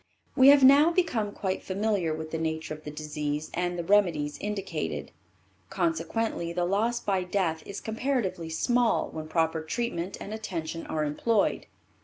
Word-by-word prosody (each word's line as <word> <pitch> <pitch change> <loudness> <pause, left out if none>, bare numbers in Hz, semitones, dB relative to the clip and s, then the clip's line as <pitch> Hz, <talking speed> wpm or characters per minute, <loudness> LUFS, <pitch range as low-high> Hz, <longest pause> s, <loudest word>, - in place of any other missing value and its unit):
We 260 - +7
have 280 -1 +8
now 280 +4 +8
become 245 - 0
quite 190 -2 -3
familiar 195 -3 0
with 155 0 -5
the 160 - -2
nature 160 -1 -2
of 155 0 -11
the - - -4
disease 150 0 -4
and 175 0 -1
the 170 - -2
remedies 170 -6 +2
indicated; 205 -2 -4 0.6
consequently 225 - -1
the 175 0 0
loss 220 +6 +1
by 190 -4 0
death 180 -4 -1
is 200 - -5
comparatively 220 -8 -2
small 240 +8 +1
when 155 -1 -6
proper 160 0 0
treatment 185 0 -3
and 210 - -6
attention 165 -7 -5
are 155 -1 -1
employed. 200 +9 0
185 Hz, 155 wpm, -28 LUFS, 160-220 Hz, 0.6 s, have